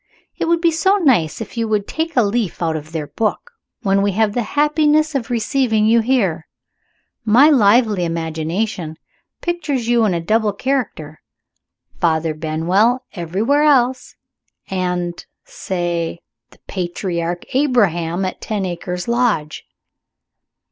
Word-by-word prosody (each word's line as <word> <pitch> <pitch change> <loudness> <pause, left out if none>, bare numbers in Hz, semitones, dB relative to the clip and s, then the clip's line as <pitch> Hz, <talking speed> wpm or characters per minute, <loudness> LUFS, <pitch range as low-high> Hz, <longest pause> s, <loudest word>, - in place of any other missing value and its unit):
It - - 0
would 335 0 +1
be 340 -1 +3
so 380 +5 +2
nice 240 - +2
if 225 - -8
you 230 -1 0
would 210 -2 -1
take 320 -2 -3
a 245 - +6
leaf 210 -2 -1
out 165 -2 -1
of 155 0 -7
their 160 -2 -3
book, 225 - -3 0.3
when 195 -1 +2
we 200 -1 +1
have 215 +1 +1
the 245 - 0 0.2
happiness 300 +1 +3
of 265 -4 -2
receiving 230 -2 +1
you 230 +2 +4
here. 220 -10 0 0.8
My 245 +8 +6
lively 215 -5 +4
imagination 165 +1 -3 0.4
pictures 300 -9 -2
you 240 -1 +3
in 190 -4 +1
a - - 0
double 215 +4 +1
character. 200 - -3 0.8
Father 160 -1 +1
Benwell 175 +11 +1
everywhere 200 - 0
else; 260 -4 +2 0.6
and 180 -2 -2 0.2
say, 175 -2 -3 0.3
the - - -21
patriarch 175 -1 -3
Abraham 195 - +1
at 185 - -5
Ten 210 -3 -2
Acres 180 +1 -4
Lodge." 235 -11 0
210 Hz, 135 wpm, -19 LUFS, 175-250 Hz, 0.8 s, a